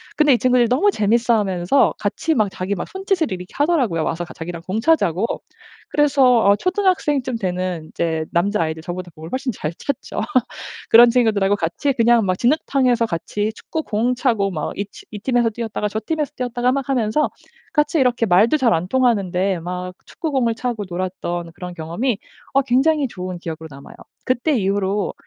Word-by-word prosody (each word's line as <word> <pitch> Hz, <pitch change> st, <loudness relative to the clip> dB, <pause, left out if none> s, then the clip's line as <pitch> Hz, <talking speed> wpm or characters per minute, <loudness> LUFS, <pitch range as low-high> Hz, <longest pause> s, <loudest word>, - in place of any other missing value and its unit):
근데 300 Hz, -2 st, +4 dB
이 245 Hz, -, +4 dB
친구들이 250 Hz, -2 st, +3 dB
너무 285 Hz, +12 st, +3 dB
재밌어하면서 215 Hz, -, +2 dB
같이 325 Hz, -, -1 dB
막 215 Hz, -7 st, +2 dB
자기 190 Hz, +2 st, -3 dB
막 180 Hz, -, -5 dB
손짓을 380 Hz, -4 st, -1 dB
이렇게 180 Hz, -1 st, -5 dB
하더라고요. 270 Hz, -, +1 dB
와서 170 Hz, +1 st, -2 dB
같이 175 Hz, -, -11 dB
자기랑 170 Hz, 0 st, -6 dB
공 195 Hz, +4 st, -1 dB
차자고. 225 Hz, -, +2 dB, 0.6 s
그래서 270 Hz, -5 st, +4 dB
어 200 Hz, 0 st, +6 dB
초등학생쯤 315 Hz, -, 0 dB
되는 180 Hz, -4 st, -3 dB
이제 160 Hz, -2 st, -1 dB
남자아이들 170 Hz, -3 st, 0 dB
저보다 175 Hz, 0 st, -6 dB
공을 160 Hz, +1 st, -9 dB
훨씬 260 Hz, 0 st, -1 dB
잘 165 Hz, -6 st, -4 dB
찼죠. 280 Hz, -, -4 dB, 0.7 s
그런 235 Hz, +1 st, +8 dB
친구들하고 215 Hz, -5 st, +2 dB
같이 200 Hz, -, -1 dB
그냥 235 Hz, -2 st, +4 dB
막 185 Hz, 0 st, +1 dB
진흙탕에서 255 Hz, -3 st, +2 dB
같이 205 Hz, +4 st, -2 dB
축구공 245 Hz, -6 st, -2 dB
차고 225 Hz, -6 st, +1 dB
막 155 Hz, -4 st, -3 dB
이 200 Hz, -, 0 dB
티 200 Hz, -, -15 dB
이 210 Hz, -, -6 dB
팀에서 240 Hz, +1 st, +1 dB
뛰었다가 220 Hz, -2 st, -3 dB
저 215 Hz, +1 st, -3 dB
팀에서 305 Hz, -3 st, -1 dB
뛰었다가 245 Hz, 0 st, 0 dB
막 275 Hz, 0 st, -2 dB
하면서 255 Hz, +2 st, +1 dB, 0.4 s
같이 295 Hz, +1 st, +2 dB
이렇게 245 Hz, -3 st, +2 dB
말도 210 Hz, +10 st, +4 dB
잘 250 Hz, -, +3 dB
안 165 Hz, +2 st, -2 dB
통하는데 195 Hz, -7 st, +1 dB
막 180 Hz, +1 st, -5 dB
축구공을 265 Hz, -8 st, -1 dB
차고 230 Hz, -2 st, -3 dB
놀았던 175 Hz, -1 st, -4 dB
그런 180 Hz, 0 st, -7 dB
경험이 180 Hz, +8 st, -2 dB, 0.3 s
어 275 Hz, -, +4 dB
굉장히 275 Hz, +3 st, +2 dB
좋은 185 Hz, -5 st, -6 dB
기억으로 160 Hz, -1 st, -7 dB
남아요. 140 Hz, +1 st, -12 dB, 0.3 s
그때 260 Hz, +4 st, +1 dB
이후로 195 Hz, 0 st, 0 dB
220 Hz, 390 characters per minute, -20 LUFS, 180-260 Hz, 0.7 s, 그런